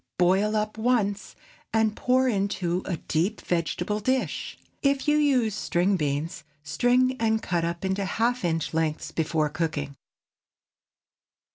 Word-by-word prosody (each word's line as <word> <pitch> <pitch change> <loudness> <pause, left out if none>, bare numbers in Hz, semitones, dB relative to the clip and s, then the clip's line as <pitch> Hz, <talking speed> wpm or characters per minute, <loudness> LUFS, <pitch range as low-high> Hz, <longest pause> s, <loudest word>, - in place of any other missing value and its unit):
Boil 190 +4 +3
up 215 +1 -2
once, 215 -4 0 0.4
and 220 -1 +2
pour 255 +1 +2
into 195 -5 0
a 175 - -2
deep 175 +9 -1
vegetable 175 +4 -1
dish. 260 +4 -1 0.2
If 275 0 +1
you 295 - +4
use 265 -7 +3
string 185 +1 +1
beans, 150 +1 -2 0.2
string 250 - +2
and 220 -1 +2
cut 175 -5 -1
up 170 +2 -3
into 190 +1 0
half 235 +5 0
inch 165 -2 -1
lengths 160 -1 -1
before 155 -1 0
cooking. 145 -3 -3
195 Hz, 130 wpm, -26 LUFS, 170-230 Hz, 0.4 s, you